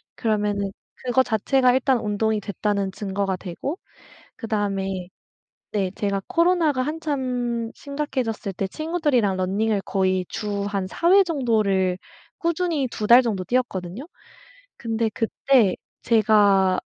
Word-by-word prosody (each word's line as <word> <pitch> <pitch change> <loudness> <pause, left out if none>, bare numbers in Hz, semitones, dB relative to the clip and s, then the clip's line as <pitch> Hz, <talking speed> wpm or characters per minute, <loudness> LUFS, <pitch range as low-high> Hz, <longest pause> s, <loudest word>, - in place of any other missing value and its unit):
그러면은 205 -3 -1 0.3
그거 255 +1 +3
자체가 250 +3 +2
일단 260 -1 +2
운동이 215 0 0
됐다는 200 -1 -2
증거가 195 -1 -2
되고 195 - -5 0.6
그다음에 195 -5 -2 0.6
네 195 -3 0
제가 200 -1 -1
코로나가 335 -5 +2
한참 255 -6 -2
심각해졌을 265 -8 -3
때 195 - -2
친구들이랑 295 - 0
running을 200 +3 0
거의 185 -1 0
주 205 -2 -3
한 200 -2 -2
4 340 - 0
회 395 +1 +8
정도를 215 - +1 0.4
꾸준히 335 -5 0
2 210 - -3
달 240 +3 +8
정도 205 -6 -2
뛰었거든요? 235 - -2 0.7
근데 225 -1 -1
그때 225 -2 +2 0.3
제가 205 -4 +4
220 Hz, 280 characters per minute, -23 LUFS, 195-260 Hz, 0.7 s, 회